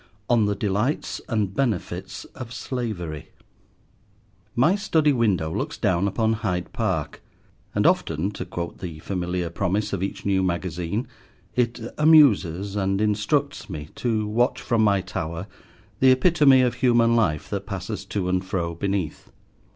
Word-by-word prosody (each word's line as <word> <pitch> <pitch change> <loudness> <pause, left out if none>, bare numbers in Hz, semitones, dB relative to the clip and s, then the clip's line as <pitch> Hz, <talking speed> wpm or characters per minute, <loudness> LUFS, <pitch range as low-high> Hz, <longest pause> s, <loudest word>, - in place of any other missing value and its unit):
ON 115 -3 +4
THE 105 - 0
DELIGHTS 105 +7 -1
AND 105 -5 0
BENEFITS 110 -6 -2
OF 125 -3 -8
SLAVERY 105 - -4 1.3
MY 140 +9 +4
study 160 -7 +2
window 95 -10 +1
looks - - -3
down 90 +2 +1
upon 110 +3 +1
Hyde 95 -6 -3
Park, - - -2 0.5
and - - +2
often, 85 +7 +2
to 100 - -5
quote 85 -1 -6
the 85 -5 -6
familiar 90 0 -3
promise 100 +4 -1
of 95 - -2
each 100 - -4
new 95 -1 +2
magazine, 90 - -2 0.5
it 120 -1 +1 0.2
amuses 105 - +5
and 95 -1 0
instructs 110 +8 0
me 75 -4 -6
to 110 -3 -1
watch 120 +4 +1
from 115 -4 +1
my 100 -2 +3
tower 85 -1 -4 0.5
the 130 - +6
epitome 135 -1 +5
of 125 - +1
human 120 -2 +3
life 85 -10 +1
that - - -3
passes - - -4
to 95 -3 -2
and 90 0 +1
fro 85 -3 -2
beneath. 95 -2 -3
100 Hz, 145 wpm, -24 LUFS, 90-120 Hz, 1.3 s, the